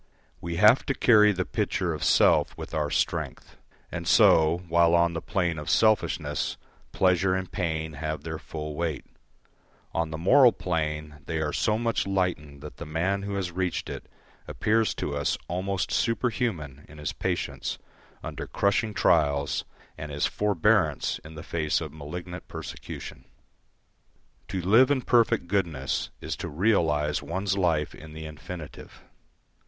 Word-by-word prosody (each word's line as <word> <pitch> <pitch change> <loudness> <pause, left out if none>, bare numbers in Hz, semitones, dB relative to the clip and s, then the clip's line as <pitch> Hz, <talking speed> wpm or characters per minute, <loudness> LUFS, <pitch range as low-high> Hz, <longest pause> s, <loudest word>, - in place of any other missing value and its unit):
We 85 0 -4
have 105 +8 +6
to 135 - 0
carry 105 -3 +6
the 95 -2 -2
pitcher - - -1
of - - -5
self - - +4
with - - -8
our 75 -1 0
strength; - - -2 0.4
and 85 -1 -5
so, 80 +2 +5
while 85 0 +4
on 85 0 +3
the 80 - -3
plane 85 -5 -1
of 75 - -6
selfishness 110 -1 +1 0.3
pleasure 95 0 +2
and 95 -1 -4
pain 80 -3 -2
have 75 +2 -4
their 80 -1 -5
full 75 -1 -6
weight, 80 -1 -3 0.9
on 85 -1 0
the 80 - -5
moral 120 - +6
plane 75 -3 -3
they 80 -1 -2
are 75 -1 -1
so 105 -1 +1
much 115 -3 0
lightened 90 -7 -2
that 75 - -10
the 85 - -7
man 90 +6 0
who 100 0 -4
has 95 -3 -2
reached 90 0 -2
it - - -8 0.4
appears 110 +1 +1
to 70 - -3
us 70 - 0
almost 95 +2 -2
superhuman 110 - -1
in 75 - -13
his 75 - -4
patience - - -3 0.5
under - - -6
crushing 105 +1 0
trails, 70 -1 +2 0.3
and 75 0 -6
his 70 0 0
forbearance 105 -5 +1
in 80 0 -11
the 80 - -8
face 80 -4 0
of 75 -3 -6
malignant 90 +4 -7
persecution. - - -8 1.2
To 95 - -3
live 115 +9 +5
in 135 -3 +1
perfect 115 -7 +3
goodness 85 -8 -1
is - - -3
to - - -5
realise 75 -5 +1
one's 95 +2 -2
life 85 -6 +1
in 80 0 -12
the 80 0 -7
infinitive. 75 +1 -9
85 Hz, 150 wpm, -27 LUFS, 75-100 Hz, 1.2 s, have